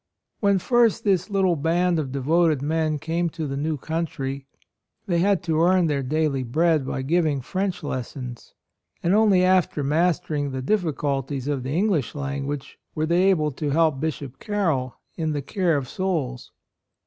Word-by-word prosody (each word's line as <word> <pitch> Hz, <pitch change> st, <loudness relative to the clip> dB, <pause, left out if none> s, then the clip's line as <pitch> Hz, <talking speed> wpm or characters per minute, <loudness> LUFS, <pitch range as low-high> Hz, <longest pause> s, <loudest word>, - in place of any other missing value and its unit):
When 200 Hz, -2 st, +3 dB
first 235 Hz, +2 st, +2 dB
this 190 Hz, -2 st, +1 dB
little 190 Hz, -3 st, +2 dB
band 170 Hz, +3 st, +1 dB
of 140 Hz, -4 st, -3 dB
devoted 150 Hz, +2 st, +2 dB
men 155 Hz, 0 st, 0 dB
came 165 Hz, +3 st, -1 dB
to 160 Hz, -1 st, -5 dB
the 135 Hz, -1 st, -3 dB
new 150 Hz, +2 st, -1 dB
country, 140 Hz, -3 st, -4 dB, 0.6 s
they 175 Hz, -5 st, +1 dB
had 195 Hz, 0 st, +2 dB
to 160 Hz, -2 st, +1 dB
earn 180 Hz, +1 st, +4 dB
their 145 Hz, -3 st, 0 dB
daily 145 Hz, 0 st, 0 dB
bread 155 Hz, +3 st, +1 dB
by 130 Hz, -, -3 dB
giving 155 Hz, -1 st, +1 dB
French 185 Hz, +7 st, -3 dB
lessons; 125 Hz, -3 st, -6 dB, 0.5 s
and 175 Hz, -, +2 dB
only 205 Hz, -4 st, +4 dB
after 185 Hz, -5 st, +2 dB
mastering 150 Hz, -1 st, 0 dB
the 130 Hz, -, -3 dB
diffi 175 Hz, 0 st, +1 dB
culties 135 Hz, -1 st, -2 dB
of 145 Hz, -3 st, -1 dB
the 135 Hz, +5 st, -2 dB
English 185 Hz, -, 0 dB
language 140 Hz, 0 st, -4 dB, 0.2 s
were 155 Hz, -, 0 dB
they 175 Hz, +4 st, +3 dB
able 155 Hz, -5 st, +2 dB
to 145 Hz, +2 st, -3 dB
help 155 Hz, -1 st, +2 dB
Bishop 140 Hz, -3 st, -4 dB
Carroll 160 Hz, -, -1 dB, 0.2 s
in 160 Hz, -2 st, -1 dB
the 145 Hz, -, -2 dB
care 175 Hz, 0 st, +1 dB
of 135 Hz, -3 st, -3 dB
souls. 150 Hz, -8 st, -3 dB
155 Hz, 165 wpm, -24 LUFS, 140-175 Hz, 0.6 s, earn